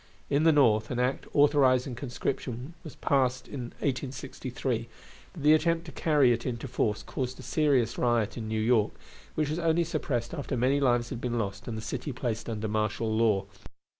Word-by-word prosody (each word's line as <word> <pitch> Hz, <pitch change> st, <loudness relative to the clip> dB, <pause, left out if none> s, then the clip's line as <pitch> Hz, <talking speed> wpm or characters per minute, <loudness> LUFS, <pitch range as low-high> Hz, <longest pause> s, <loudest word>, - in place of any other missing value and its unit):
In 145 Hz, +3 st, +3 dB
the 165 Hz, -, +7 dB
North 115 Hz, -7 st, +4 dB
an 125 Hz, -, -2 dB
act 125 Hz, +2 st, 0 dB
authorizing 140 Hz, -3 st, +4 dB
conscription 125 Hz, +2 st, -4 dB
was 155 Hz, -, -9 dB
passed 130 Hz, -2 st, +1 dB
in 130 Hz, -4 st, -5 dB, 0.2 s
1863, 130 Hz, -3 st, -3 dB, 0.4 s
but 160 Hz, -6 st, -9 dB
the 150 Hz, +1 st, +7 dB
attempt 165 Hz, +2 st, +2 dB
to 160 Hz, -, -8 dB
carry 145 Hz, -3 st, +3 dB
it 115 Hz, 0 st, -3 dB
into 125 Hz, +1 st, -4 dB
force 110 Hz, -4 st, -1 dB
caused 130 Hz, -1 st, -4 dB
a -, -, -9 dB
serious 130 Hz, -5 st, +1 dB
riot 120 Hz, -2 st, +1 dB
in 115 Hz, -2 st, -5 dB
New 110 Hz, 0 st, -1 dB
York, 110 Hz, -2 st, +3 dB, 0.4 s
which 150 Hz, -1 st, 0 dB
was 160 Hz, -, -2 dB
only 165 Hz, 0 st, +2 dB
suppressed 145 Hz, -7 st, -2 dB
after 140 Hz, -4 st, -3 dB
many 130 Hz, +4 st, +2 dB
lives 120 Hz, -3 st, +2 dB
had 120 Hz, -3 st, -5 dB
been 120 Hz, -1 st, -1 dB
lost 100 Hz, -3 st, -3 dB
and 115 Hz, -2 st, -4 dB
the 110 Hz, -, -6 dB
city 145 Hz, -, -4 dB
placed 120 Hz, -3 st, -3 dB
under 110 Hz, -1 st, -3 dB
martial 110 Hz, +1 st, -1 dB
law. 110 Hz, -4 st, +2 dB
125 Hz, 185 wpm, -28 LUFS, 115-145 Hz, 0.4 s, the